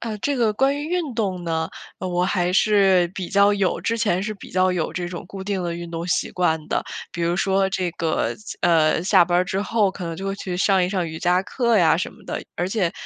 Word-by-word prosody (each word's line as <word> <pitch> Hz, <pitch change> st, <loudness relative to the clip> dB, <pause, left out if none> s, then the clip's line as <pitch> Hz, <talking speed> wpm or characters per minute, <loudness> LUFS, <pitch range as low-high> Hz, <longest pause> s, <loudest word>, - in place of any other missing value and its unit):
呃， 220 Hz, -2 st, -4 dB
这 285 Hz, +5 st, -1 dB
个 225 Hz, -3 st, +2 dB
关 270 Hz, +6 st, +2 dB
于 295 Hz, -, -4 dB
运 340 Hz, -6 st, -2 dB
动 195 Hz, -6 st, -2 dB
呢， 160 Hz, -1 st, -1 dB, 0.3 s
呃， 185 Hz, -, -4 dB
我 180 Hz, 0 st, +1 dB
还 180 Hz, -1 st, 0 dB
是 195 Hz, -3 st, +4 dB
比 185 Hz, -3 st, -4 dB
较 200 Hz, +1 st, +4 dB
有 195 Hz, -2 st, 0 dB
之 230 Hz, 0 st, -1 dB
前 200 Hz, -5 st, +1 dB
是 215 Hz, +1 st, -3 dB
比 200 Hz, -, -12 dB
较 185 Hz, 0 st, +3 dB
有 175 Hz, -3 st, -1 dB
这 175 Hz, -1 st, -3 dB
种 175 Hz, -1 st, -7 dB
固 195 Hz, 0 st, -8 dB
定 195 Hz, -1 st, -2 dB
的 170 Hz, -1 st, -2 dB
运 170 Hz, 0 st, -7 dB
动 165 Hz, +1 st, -4 dB
习 180 Hz, -, 0 dB
惯 160 Hz, -4 st, 0 dB
的， -, -, -1 dB, 0.3 s
比 170 Hz, -, -6 dB
如 170 Hz, +1 st, +1 dB
说 195 Hz, 0 st, +2 dB
这 185 Hz, -2 st, -1 dB
个 165 Hz, -2 st, -1 dB, 0.3 s
呃， 165 Hz, -1 st, +3 dB
下 190 Hz, -2 st, +5 dB
班 175 Hz, 0 st, +1 dB
儿 180 Hz, -, +2 dB
之 190 Hz, +2 st, -2 dB
后 205 Hz, -1 st, +1 dB
可 185 Hz, -2 st, -7 dB
能 165 Hz, -1 st, -4 dB
就 195 Hz, -, -6 dB
会 195 Hz, 0 st, -2 dB
去 180 Hz, -3 st, -4 dB
上 190 Hz, -1 st, +3 dB
一 -, -, -1 dB
上 185 Hz, -4 st, -1 dB
瑜 160 Hz, 0 st, -7 dB
伽 180 Hz, +1 st, +2 dB
课 235 Hz, +1 st, +1 dB
呀 165 Hz, -3 st, +4 dB
什 180 Hz, -, -3 dB
么 -, -, -19 dB
的， -, -, -4 dB
而 175 Hz, +1 st, -2 dB
且 190 Hz, -4 st, 0 dB
185 Hz, 270 characters per minute, -22 LUFS, 175-200 Hz, 0.3 s, 下